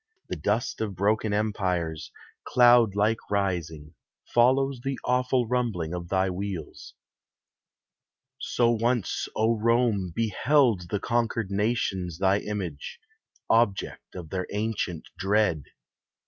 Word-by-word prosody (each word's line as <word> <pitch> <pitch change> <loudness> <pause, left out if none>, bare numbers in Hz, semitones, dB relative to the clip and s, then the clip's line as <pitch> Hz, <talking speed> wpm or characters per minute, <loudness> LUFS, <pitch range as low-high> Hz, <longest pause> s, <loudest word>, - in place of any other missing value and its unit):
The - - -2
dust 110 +3 -1
of 105 -3 -3
broken 105 +3 +1
empires, 90 -7 -1 0.3
cloud 120 -4 +5
like 110 +2 +2
rising, 85 -6 -2 0.4
Follows 130 +2 +3
the 135 -1 -2
awful 125 -1 +1
rumbling 110 -10 -1
of 85 -1 -5
thy 95 0 +2
wheels. 90 -3 -6 1.4
So 120 -1 +1
once, 120 -2 0
O 110 +2 +2
Rome, 115 -5 +1
beheld 115 - +2
the 105 - -1
conquered 115 -2 -1
nations 100 -5 -1
Thy 95 +2 +2
image, 100 - -5 0.5
object 115 -4 0
of 85 -4 -8
their 90 -1 -3
ancient 105 -5 -3
dread. 95 -7 +1
105 Hz, 110 wpm, -26 LUFS, 95-120 Hz, 1.4 s, cloud